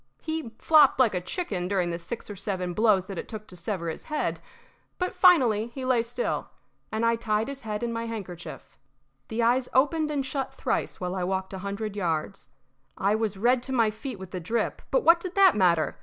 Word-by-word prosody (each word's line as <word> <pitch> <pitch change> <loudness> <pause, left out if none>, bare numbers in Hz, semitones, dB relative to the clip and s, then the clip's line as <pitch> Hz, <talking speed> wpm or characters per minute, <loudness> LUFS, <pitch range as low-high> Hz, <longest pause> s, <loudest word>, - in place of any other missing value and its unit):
He 315 -6 -3
flopped 305 -4 +5
like 240 -5 +4
a 180 - -1
chicken 185 - -3
during 185 -3 0
the 170 - -3
six 200 +7 -6
or 205 - -7
seven 185 -2 -3
blows 210 -2 +3
that 190 -2 -6
it - - -6
took 215 -2 -7
to 180 - -10
sever 175 0 -3
his 160 - -5
head; 305 -1 -2 0.6
but 365 0 -2
finally 245 - +5
he 255 +2 -7
lay 255 -2 +3
still, 235 - -3 0.4
and 220 +1 0
I 230 0 +3
tied 220 -1 0
his 280 -1 -6
head 215 0 -4
in 235 -1 -1
my 230 0 -3
handkerchief. 185 -6 -8 0.5
The 230 +1 -1
eyes 245 +2 +2
opened 300 +4 +3
and 285 -3 -1
shut 270 0 -3
thrice - - -2
while 180 0 -3
I 185 -1 -2
walked 190 +1 -2
a 190 - -5
hundred 200 +2 -4
yards. 175 0 -2 0.5
I 200 +2 +2
was 215 -2 -1
red 240 +4 +3
to 265 - -6
my 230 -4 +3
feet 230 +2 -7
with 190 -1 -10
the 185 - -4
drip, 220 +6 -2
but - - +2
what 335 +1 +7
did 365 +1 -6
that 390 -2 +6
matter? 175 -5 +2
220 Hz, 215 wpm, -27 LUFS, 190-260 Hz, 0.6 s, what